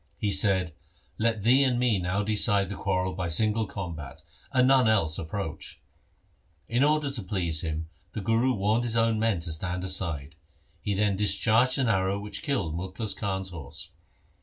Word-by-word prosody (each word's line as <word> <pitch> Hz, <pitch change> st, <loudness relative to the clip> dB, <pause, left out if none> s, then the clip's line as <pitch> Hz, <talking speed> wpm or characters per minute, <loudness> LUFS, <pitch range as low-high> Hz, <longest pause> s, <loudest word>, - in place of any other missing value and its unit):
He 105 Hz, -, -1 dB
said, 95 Hz, -4 st, +2 dB, 0.2 s
' -, -, -34 dB
Let 110 Hz, -2 st, +1 dB
thee 125 Hz, +5 st, +5 dB
and 130 Hz, -3 st, +2 dB
me 120 Hz, -5 st, +2 dB
now 90 Hz, +3 st, -1 dB
decide 100 Hz, -2 st, +2 dB
the 100 Hz, -, -4 dB
quarrel 95 Hz, -1 st, -1 dB
by 90 Hz, -1 st, -3 dB
single 110 Hz, +6 st, +2 dB
combat, 80 Hz, -6 st, -7 dB, 0.3 s
and 130 Hz, -1 st, +4 dB
none 130 Hz, -3 st, +5 dB
else 80 Hz, -8 st, +2 dB
approach.' 80 Hz, 0 st, -5 dB, 0.9 s
In 120 Hz, +3 st, +2 dB
order 150 Hz, -1 st, +2 dB
to 130 Hz, -4 st, -2 dB
please 90 Hz, -5 st, 0 dB
him 80 Hz, 0 st, -3 dB, 0.3 s
the 110 Hz, -, -4 dB
Guru 115 Hz, +5 st, +2 dB
warned 105 Hz, +4 st, +1 dB
his 115 Hz, -1 st, -1 dB
own 115 Hz, -1 st, +2 dB
men 110 Hz, -6 st, +1 dB
to 80 Hz, -1 st, -5 dB
stand 90 Hz, +3 st, -3 dB
aside. 85 Hz, -6 st, -2 dB, 0.5 s
He 100 Hz, -, -1 dB
then 100 Hz, -1 st, +1 dB
discharged 110 Hz, +5 st, +3 dB
an 130 Hz, -2 st, +1 dB
arrow 95 Hz, -2 st, +1 dB
which 105 Hz, 0 st, -5 dB
killed 125 Hz, -, -1 dB
Mukhlis 95 Hz, +4 st, -3 dB
Khan's 95 Hz, -2 st, -3 dB
horse. 80 Hz, -8 st, -7 dB
100 Hz, 175 wpm, -27 LUFS, 90-115 Hz, 0.9 s, thee